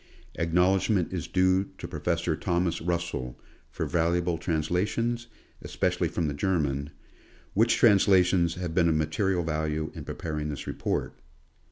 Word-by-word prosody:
Acknowledgment 90 Hz, +3 st, +2 dB
is 85 Hz, -4 st, -3 dB
due 95 Hz, +1 st, +2 dB
to -, -, -6 dB
Professor 85 Hz, +2 st, -1 dB
Thomas 85 Hz, +1 st, -1 dB
Russell, 85 Hz, -7 st, -3 dB, 0.3 s
for -, -, -3 dB
val 85 Hz, 0 st, +1 dB
uable 85 Hz, -1 st, 0 dB
translations, 100 Hz, +9 st, -1 dB, 0.3 s
especially -, -, 0 dB
from 85 Hz, -, -2 dB
the 75 Hz, -, -2 dB
German; 70 Hz, -4 st, -1 dB, 0.6 s
which 115 Hz, +4 st, +3 dB
transla 100 Hz, -5 st, +6 dB
tions 85 Hz, -2 st, +1 dB
have 90 Hz, -2 st, -4 dB
been 85 Hz, -1 st, +3 dB
of 80 Hz, -, +2 dB
material 85 Hz, +4 st, 0 dB
value 80 Hz, -1 st, -2 dB
in 80 Hz, -, -7 dB
preparing 75 Hz, 0 st, -4 dB
this 75 Hz, -, -5 dB
report. -, -, -3 dB
85 Hz, 140 wpm, -27 LUFS, 80-95 Hz, 0.6 s, transla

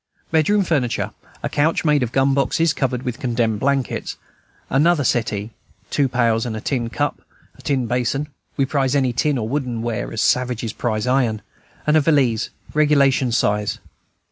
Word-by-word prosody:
Bedroom 165 Hz, +6 st, +3 dB
furniture, 140 Hz, -9 st, 0 dB, 0.3 s
a -, -, 0 dB
couch 160 Hz, +3 st, +1 dB
made 150 Hz, -2 st, +3 dB
of 120 Hz, -2 st, -1 dB
gun 135 Hz, +1 st, +2 dB
boxes 155 Hz, +4 st, +2 dB
covered 130 Hz, -2 st, -1 dB
with 125 Hz, 0 st, -4 dB
condemned 115 Hz, -5 st, 0 dB
blankets, 135 Hz, -2 st, -1 dB, 0.5 s
another 150 Hz, +3 st, +3 dB
settee, 110 Hz, -3 st, -1 dB, 0.4 s
two 140 Hz, -2 st, +2 dB
pails, 115 Hz, -3 st, +2 dB
a 110 Hz, -2 st, -3 dB
tin 120 Hz, -3 st, -1 dB
cup, 145 Hz, +4 st, -2 dB, 0.4 s
tin 135 Hz, -3 st, 0 dB
basin 125 Hz, +5 st, -1 dB, 0.3 s
(we 135 Hz, -, +3 dB
prize 135 Hz, -1 st, 0 dB
any 130 Hz, -3 st, +2 dB
tin 145 Hz, +3 st, +1 dB
or 110 Hz, -3 st, -2 dB
wooden 125 Hz, -3 st, -2 dB
ware 115 Hz, -2 st, -3 dB
as 115 Hz, -, -4 dB
savages 120 Hz, -2 st, +1 dB
prize 110 Hz, -2 st, -2 dB
iron), 125 Hz, -4 st, +1 dB, 0.4 s
and 150 Hz, -, +3 dB
a -, -, +5 dB
valise, 135 Hz, -7 st, +2 dB, 0.2 s
regulation 140 Hz, -4 st, +3 dB
size. 105 Hz, -2 st, +1 dB
130 Hz, 155 wpm, -21 LUFS, 115-145 Hz, 0.5 s, a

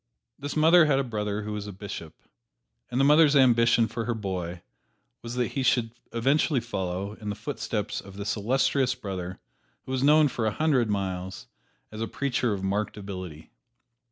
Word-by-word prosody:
This 145 Hz, +1 st, -5 dB
mother 160 Hz, +2 st, +6 dB
had 145 Hz, -3 st, +3 dB
a 135 Hz, -, +2 dB
brother 105 Hz, -3 st, -3 dB
who 105 Hz, 0 st, -4 dB
was 105 Hz, -1 st, -5 dB
a -, -, -5 dB
bishop, 95 Hz, -5 st, -8 dB, 0.7 s
and 125 Hz, -, -1 dB
the 135 Hz, -, +4 dB
mother's 150 Hz, 0 st, +6 dB
ambition 120 Hz, -3 st, +5 dB
for 115 Hz, +1 st, -4 dB
her 120 Hz, 0 st, -1 dB
boy 90 Hz, -4 st, -4 dB, 0.6 s
was 120 Hz, +1 st, -6 dB
that 125 Hz, -1 st, 0 dB
he 135 Hz, -, -2 dB
should 120 Hz, -3 st, +2 dB, 0.2 s
eventually 135 Hz, +4 st, +2 dB
follow 95 Hz, -4 st, -3 dB
in 105 Hz, -, -4 dB
the 100 Hz, -, -2 dB
footsteps -, -, -3 dB
of 100 Hz, 0 st, -13 dB
this 100 Hz, 0 st, -2 dB
illustrious 130 Hz, +4 st, +1 dB
brother 95 Hz, -6 st, -5 dB, 0.5 s
who -, -, -7 dB
was 130 Hz, -1 st, 0 dB
known 150 Hz, +2 st, +6 dB
for 115 Hz, -5 st, -2 dB
a -, -, +1 dB
hundred 140 Hz, -7 st, +2 dB
miles 95 Hz, -7 st, -3 dB, 0.5 s
as 110 Hz, 0 st, -7 dB
a 115 Hz, -, -1 dB
preacher 125 Hz, -4 st, -1 dB
of 100 Hz, -2 st, -3 dB
marked 100 Hz, +3 st, -1 dB
ability. 90 Hz, -6 st, -8 dB
115 Hz, 180 wpm, -27 LUFS, 100-130 Hz, 0.7 s, mother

